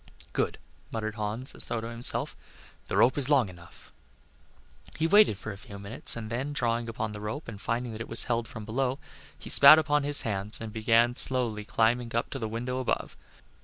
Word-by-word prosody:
"Good," - - -2 0.3
muttered 110 -1 -4
Hans, 110 +4 -4
as - - -2
though 120 - -2
to 110 - -7
himself. 120 +1 +2 0.5
"The - - -3
rope 130 +4 +3
is 140 -1 +3
long 135 -9 +3
enough." 85 -2 -16 1.0
He 160 - 0
waited 200 - +4
for 110 - -7
a 100 - -11
few 110 -4 -11
minutes 100 +2 +2
and 110 -1 -7
then, 135 +5 -4
drawing 115 -3 -2
upon 110 -1 -4
the 105 0 -9
rope 120 +9 -6
and 105 -3 -9
finding 120 +2 -3
that 110 0 -8
it - - -7
was 115 - +3
held 120 -2 -2
from 110 0 -9
below, 130 +4 -2 0.4
he - - -10
spat 140 +2 +9
upon 150 -1 +1
his 145 0 +5
hands 105 -2 -3
and 110 -1 -8
began 115 +2 +2
slowly 120 -4 +2
climbing 115 +1 0
up 115 - -2
to 135 - -5
the 110 -3 -4
window 125 +3 -4
above. 130 - -3
115 Hz, 200 wpm, -27 LUFS, 110-130 Hz, 1.0 s, spat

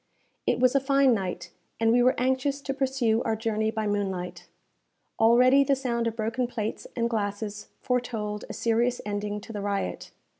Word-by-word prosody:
It - - +2
was 255 0 +4
a 275 - +4
fine 275 -1 +4
night, 180 -4 -3 0.3
and 225 0 +3
we 245 +1 +4
were 255 +2 +4
anxious 260 +2 0
to 270 - -3
pursue 260 -4 +1
our 225 - 0
journey 220 -1 -1
by 220 0 -2
moonlight. 195 -3 -3 0.7
Already 250 +4 +6
the 275 0 +2
sound 235 -3 -1
of 225 - -2
broken 230 +3 -1
plates 225 -3 -4
and 235 -1 +1
glasses 210 -1 -3
foretold 225 -4 -2
a - - -5
serious 235 +2 +1
ending 205 0 -3
to 225 - -10
the 205 - -4
riot. 200 -1 -3
230 Hz, 175 wpm, -27 LUFS, 210-255 Hz, 0.7 s, Already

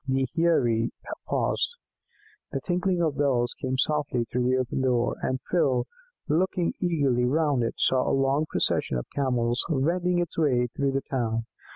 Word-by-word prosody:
The 135 0 +1
Heirie 120 -9 +2 0.4
paused. 475 - 0 0.8
The 135 - -2
tinkling 180 +2 0
of 150 -4 -1
bells 125 -4 +1
came 130 0 -1
softly 140 -3 0
through 125 +1 -1
the 130 - +3
open 130 +1 -1
door, 125 -2 +1
and 130 0 -1
Phil, 130 -8 +2 0.4
looking 175 +2 +1
eagerly 140 -9 +1
round 145 0 +2
it, 115 - -1
saw 130 -1 +2
a 135 - +2
long 135 +3 +1
procession 65 - 0
of - - -4
Camels 125 -3 0
wending 175 +5 +1
its 175 -1 -2
way 130 -6 +3
through 140 -1 0
the 135 - 0
town. 115 -3 -2
135 Hz, 160 wpm, -26 LUFS, 125-160 Hz, 0.8 s, the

